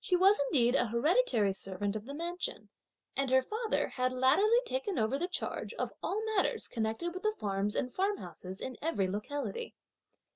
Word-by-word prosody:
She 365 - +2
was 385 +3 +6
indeed 245 -3 +3
an 245 -3 +3
hereditary 235 - +3
servant 195 +1 -3
of 215 0 -4
the 280 +2 -6
mansion; 345 +3 -4 0.5
and 275 -1 0
her 260 0 +5
father 440 - 0
had 255 0 0
latterly 280 - +4
taken 475 -5 -2
over 225 +4 +1
the 350 - 0
charge 365 - -3
of - - -2
all 425 +3 -1
matters 385 - +1
connected 225 +9 -2
with 370 - -6
the 430 +1 0
farms 200 +1 0
and 250 - -1
farmhouses 190 - -2
in 260 -2 -5
every 290 - +1
locality. 285 - -4
270 Hz, 175 wpm, -32 LUFS, -, 0.5 s, was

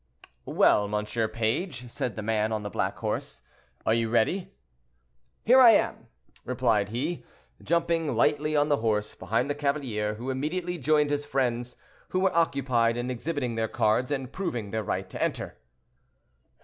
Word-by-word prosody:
"Well, 105 - +4
monsieur 105 +2 -1
page," 120 - -2
said 120 -4 -3
the 110 - -5
man 110 0 0
on 110 -1 -2
the 105 - -5
black - - -1
horse, 65 0 -4 0.4
"are 110 - +3
you 115 -1 +1
ready?" 180 - +1 0.9
"Here 255 +4 +7
I 235 -3 +9
am," - - 0 0.4
replied 115 -5 +1
he, 145 +10 -3 0.4
jumping 165 -4 0
lightly 150 +6 +2
on 145 0 +3
the 145 -1 +2
horse, 105 -2 0
behind 115 +5 -1
the 145 - 0
cavalier, 135 -8 -1
who 125 +5 -4
immediately 170 +6 -3
joined 150 +1 +2
his 145 0 -1
friends 125 -3 -1 0.3
who 185 - 0
were 190 -2 +2
occupied 130 -8 +2
in 120 +1 -2
exhibiting 130 -1 -2
their 110 0 -1
cards 110 +2 +1
and 135 -3 -3
proving 125 - -3
their 110 - -1
right - - -2
to - - -7
enter. - - -2
125 Hz, 160 wpm, -27 LUFS, 110-150 Hz, 0.9 s, I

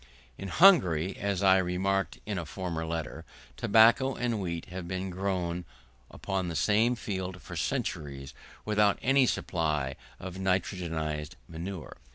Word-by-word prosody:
In 95 - -7
Hungary, 95 - +5
as 100 -1 -1
I 95 -1 +6
remarked 95 +2 0
in 105 -3 -2
a 85 - -5
former 85 -1 -4
Letter, 80 -1 -4 0.3
tobacco 115 +5 +5
and 120 -4 -1
wheat 85 -3 -3
have 90 -1 -6
been 95 +1 -3
grown 90 -2 -2 0.5
upon 95 -2 -3
the 85 - -4
same 110 +7 +3
field 95 -5 -4
for 90 - -9
centuries, 75 - -3 0.3
without 105 -1 +3
any 135 0 +4
supply 75 -10 -1 0.2
of 95 0 -7
nitrogenised 85 -4 -2
manure. 85 +1 -7
95 Hz, 135 wpm, -29 LUFS, 85-100 Hz, 0.5 s, I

